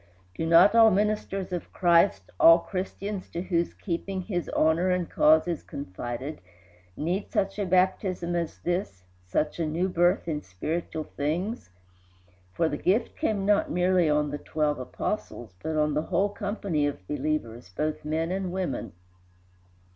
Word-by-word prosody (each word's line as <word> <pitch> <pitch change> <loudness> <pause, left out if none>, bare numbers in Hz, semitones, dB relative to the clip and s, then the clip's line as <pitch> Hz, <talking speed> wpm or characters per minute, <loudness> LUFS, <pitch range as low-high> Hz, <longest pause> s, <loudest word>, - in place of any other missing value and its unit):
Do 160 - -3
not 170 +5 +7
all 225 -1 +7
ministers 195 -2 -1
of 175 - -5
Christ, 170 - +3
all 165 0 +9
Christians 190 +2 -5
to 170 - -4
whose 170 -2 -1
keeping 185 +1 -3
his 175 -4 -3
honor 160 +4 +2
and 180 -2 0
cause 155 +2 +4
is 170 -3 -2
confided, 130 +3 -6 0.6
need 180 +6 -2
such 195 +1 -1
a 200 - -1
baptism 185 -1 +1
as 170 -1 -2
this, 175 - -2 0.2
such 150 - -1
a 165 - +1
new 170 +5 0
birth 175 +1 +2
in 150 -2 -2
spiritual 155 - -4
things? 165 - -3 0.8
For 165 - +1
the - - -2
gift 220 +6 +1
came 200 -3 -1
not 205 0 +3
merely 180 -1 +2
on 150 -1 +1
the 145 - -4
twelve 150 -2 -1
Apostles, 125 - -4
but 160 0 -2
on 150 -1 +2
the 150 - +1
whole 190 +3 +2
company 200 -7 -1
of 95 -10 -6
believers, 125 -9 -3
both 155 +10 -3
men 160 +3 -1
and 190 -1 -2
women. 180 -8 -3
170 Hz, 155 wpm, -27 LUFS, 150-190 Hz, 0.8 s, all